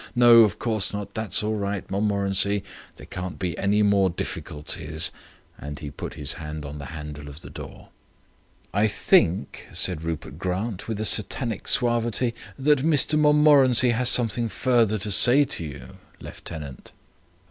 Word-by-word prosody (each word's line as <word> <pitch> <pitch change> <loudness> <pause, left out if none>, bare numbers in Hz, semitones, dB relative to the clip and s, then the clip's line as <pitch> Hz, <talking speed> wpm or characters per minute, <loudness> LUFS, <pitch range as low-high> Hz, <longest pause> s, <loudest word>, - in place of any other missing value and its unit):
"No, 120 -1 +7
of 105 -5 0
course 110 -4 -1
not. 100 -1 -6
That's 110 -1 -2
all 110 +1 -1
right, 100 -1 -4
Montmorency. 100 0 +1 0.3
There - - -13
can't 90 -1 -7
be 90 -3 -3
any 105 +2 +1
more 100 -2 +3
difficulties," 80 -1 -4 0.5
and 75 0 -7
he 70 0 -8
put 70 - -8
his 75 -2 -2
hand 75 -1 -7
on 75 +1 -8
the 70 - -8
handle 75 -1 -8
of 70 +2 -9
the - - -11
door. - - -11 0.8
"I 105 +3 +2
think," 85 -6 +1
said 90 -1 0
Rupert 80 -3 -6
Grant, 95 +2 -4
with 110 -2 -4
a 110 - -2
satanic 110 +1 0
suavity, 120 -1 0 0.2
"that 145 +1 +2
Mr 150 +1 +2
Montmorency 145 -5 +5
has 125 +2 +3
something 115 -1 +2
further 115 -1 +1
to 105 +1 -4
say 125 +8 +6
to 85 - -3
you, 65 -5 -10 0.2
lieutenant." 75 -6 -9
100 Hz, 155 wpm, -24 LUFS, 80-120 Hz, 0.8 s, No